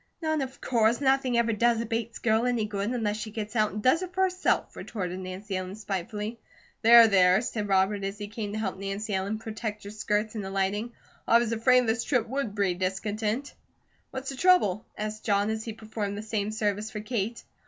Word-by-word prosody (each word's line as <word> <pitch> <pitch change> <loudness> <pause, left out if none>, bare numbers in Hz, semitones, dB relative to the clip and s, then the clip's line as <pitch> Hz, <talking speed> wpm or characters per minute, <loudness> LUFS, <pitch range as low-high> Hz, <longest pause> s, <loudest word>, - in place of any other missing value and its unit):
"None, 315 -2 +1
of 265 0 -5
course! 230 -2 +2
Nothing 265 -3 +2
ever 235 -1 +2
does 235 +2 +3
a 230 - -2
Bates 230 +1 -3
girl 225 +1 +2
any 240 -3 +1
good, 205 0 -2
unless 220 -4 -1
she 215 0 -5
gets 215 +1 -6
out 215 -2 +2
and 210 +2 -5
does 260 +7 +4
it 365 -1 -6
for 380 - +3
herself," 370 0 0
retorted 185 -4 -4
Nancy 190 +2 -5
Ellen 185 +1 -4
spitefully. 210 +2 -4 0.4
"There, 235 0 +9
there," 185 -2 +5
said 215 -4 -3
Robert 195 +1 +2
as 195 +1 -3
he 205 0 -5
came 210 -1 -5
to - - -3
help 190 -3 -3
Nancy 200 +2 -3
Ellen 195 +3 -1
protect 220 -1 -5
her 200 - -7
skirts 210 0 -1
in 215 -3 -4
alighting. 195 +4 -1 0.3
"I 230 - +7
was 235 -1 0
afraid 250 +2 +4
this 225 0 0
trip 245 -5 +1
would 255 -4 -3
breed 190 -4 0
discontent." 210 +7 -2 0.6
"What's 265 0 -5
the 270 - -8
trouble?" 290 - +3
asked 215 0 -4
John, 205 0 +2
as 220 0 -3
he 225 - -4
performed 215 -2 -4
the 210 - -5
same 215 -2 -2
service 215 -1 -1
for 210 -1 -5
Kate. 225 0 -3
215 Hz, 205 wpm, -27 LUFS, 205-235 Hz, 0.6 s, There